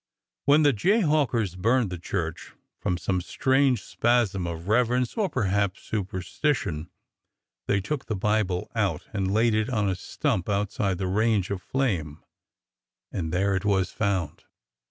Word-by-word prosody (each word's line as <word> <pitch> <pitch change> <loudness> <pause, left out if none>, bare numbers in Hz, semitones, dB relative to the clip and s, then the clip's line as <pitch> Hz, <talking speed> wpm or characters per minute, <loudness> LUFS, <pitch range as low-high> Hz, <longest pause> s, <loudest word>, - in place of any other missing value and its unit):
When 145 +2 +5
the 145 -1 +5
jayhawkers 145 - +2
burned 115 +2 +2
the 90 - -5
church, 85 -2 -4 0.3
from 90 - -1
some 90 +1 -1
strange 130 +6 +2
spasm 110 -7 +1
of 85 -1 -4
revei 120 +6 +2
ence 125 -1 -1
or 210 -4 +1
perhaps 100 - 0
superstition, 95 - -2 0.8
they 100 0 +2
took 140 +6 -4
the 110 - -1
Bible 100 -2 0
out - - -1
and 95 -2 0
laid 110 +2 +3
it 110 +2 +1
on 105 -5 +1
a 95 - +1
stump 90 0 -2
outside 100 -1 0
the 95 - -2
range 105 0 +1
of 95 -2 -2
flame, 90 - -2 0.9
and 80 -3 -3
there 95 +3 +1
it 95 - -1
was 95 -2 +1
found. 95 -8 -2
100 Hz, 150 wpm, -26 LUFS, 90-120 Hz, 0.9 s, When